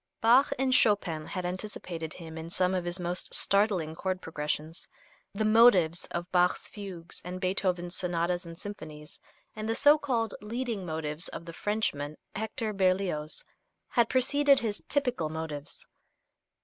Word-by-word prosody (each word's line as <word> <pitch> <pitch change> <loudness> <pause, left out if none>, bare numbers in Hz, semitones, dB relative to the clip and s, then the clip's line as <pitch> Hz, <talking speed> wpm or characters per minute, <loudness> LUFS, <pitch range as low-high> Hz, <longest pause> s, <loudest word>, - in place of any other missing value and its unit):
Bach 245 +5 +5
and 260 0 +1
Chopin 190 -10 +3
had 185 -2 -4
anticipated 180 -4 -4
him 160 -2 -9
in 160 +1 -6
some 180 +1 +1
of 180 -2 -1
his 175 +2 -1
most 175 +1 -2
startling 195 -6 +2
chord 185 +2 -2
progressions. 155 0 -4 0.5
The 215 +2 0
motives 215 -7 +5
of 175 +2 -5
Bach's 180 0 +3
fugues 185 -5 -5
and 180 +1 -5
Beethoven's 180 -1 -1
sonatas 175 0 -1
and 165 -1 -9
symphonies, 155 -6 -8 0.4
and 215 0 -4
the 225 - +1
so 295 +4 +6
called 235 -7 -1
"leading 225 -3 -3
motives" 155 +1 -2
of 170 - -7
the 170 - -8
Frenchman, 155 -8 -2 0.2
Hector 220 +1 -2
Berlioz, 185 -5 0 0.4
had 235 -2 +3
preceded 280 +2 +4
his 215 -3 -2
"typical 250 - 0
motives." 155 -2 -5
185 Hz, 145 wpm, -29 LUFS, 165-215 Hz, 0.5 s, so